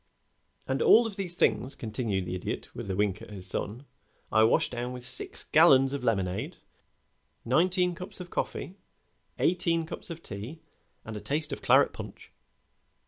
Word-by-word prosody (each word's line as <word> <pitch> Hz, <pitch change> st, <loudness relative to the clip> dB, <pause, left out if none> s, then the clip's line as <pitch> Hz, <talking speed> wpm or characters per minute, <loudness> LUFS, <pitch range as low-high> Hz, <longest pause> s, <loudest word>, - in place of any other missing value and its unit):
"And -, -, -1 dB
all 390 Hz, -, +7 dB
of 220 Hz, -3 st, -5 dB
these 185 Hz, -4 st, 0 dB
things," 120 Hz, -1 st, +1 dB
continued 110 Hz, -4 st, -2 dB
the 90 Hz, -, -4 dB
Idiot, 90 Hz, -, -5 dB
with -, -, -7 dB
a 95 Hz, -, -1 dB
wink 100 Hz, 0 st, 0 dB
at -, -, -10 dB
his 95 Hz, -3 st, -8 dB
son, 110 Hz, +7 st, -4 dB, 0.5 s
"I 110 Hz, -, +5 dB
washed 110 Hz, -, +3 dB
down 125 Hz, +1 st, -4 dB
with 125 Hz, -1 st, -6 dB
six 125 Hz, 0 st, 0 dB
gallons 135 Hz, -4 st, +5 dB
of 140 Hz, -, -4 dB
lemonade, 95 Hz, -6 st, -1 dB, 0.9 s
nineteen 180 Hz, -, +2 dB
cups 180 Hz, +2 st, -7 dB
of 180 Hz, -1 st, -9 dB
coffee, 180 Hz, -, -3 dB, 0.6 s
eighteen 165 Hz, -2 st, +1 dB
cups 160 Hz, -, -5 dB
of 165 Hz, 0 st, -8 dB
tea, 110 Hz, +11 st, -7 dB, 0.5 s
and 110 Hz, -, -6 dB
a 105 Hz, -, -6 dB
taste 150 Hz, +1 st, -2 dB
of -, -, -6 dB
claret -, -, +4 dB
punch." -, -, -10 dB
125 Hz, 165 wpm, -28 LUFS, 105-170 Hz, 0.9 s, all